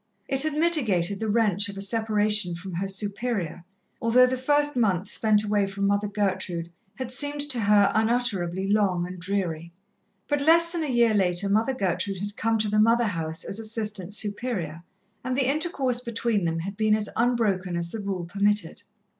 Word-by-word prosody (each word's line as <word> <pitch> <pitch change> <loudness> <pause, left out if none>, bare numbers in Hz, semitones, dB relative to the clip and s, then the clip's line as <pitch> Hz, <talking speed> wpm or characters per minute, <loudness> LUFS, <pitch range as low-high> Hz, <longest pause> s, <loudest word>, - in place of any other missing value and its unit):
It 270 -1 +3
had 310 +1 +2
mitigated 235 - +2
the 220 - -2
wrench 205 -2 +2
of 200 - -8
a - - -3
separation 210 -3 +1
from 185 +2 -8
her 185 +4 -2
Superior, 200 -3 -2 0.4
although 235 +2 +5
the 255 +1 -1
first 290 +3 +1
months 195 -5 +1
spent 215 -1 +2
away 205 -1 +1
from 200 0 -3
Mother 200 +1 +1
Gertrude 190 -4 -2 0.2
had 260 -2 -5
seemed 290 +3 +1
to 250 - 0
her 205 -1 +4
unutterably 210 -5 0
long 195 -4 +1
and 180 0 -8
dreary. 170 -3 -3 0.6
But 290 -1 0
less 335 +3 +5
than 340 -2 -2
a 300 - -3
year 235 -3 +3
later 190 -1 +2
Mother 225 +6 +1
Gertrude 195 -1 -1
had 205 +1 -5
come 225 0 0
to 215 0 0
the 210 +1 +1
Mother 230 +2 +4
house 165 -5 -4
as 195 - -5
Assistant 215 -3 -4
Superior, 205 -7 -3 0.4
and 255 0 -2
the 265 -2 +1
intercourse 275 -4 0
between 230 -4 -1
them 165 0 -1
had 195 +4 -6
been 215 0 +2
as 215 -1 -2
unbroken 210 -7 0
as 170 0 -4
the 225 - -5
rule 195 -4 -4
permitted. 200 -1 0
210 Hz, 180 wpm, -25 LUFS, 190-235 Hz, 0.6 s, although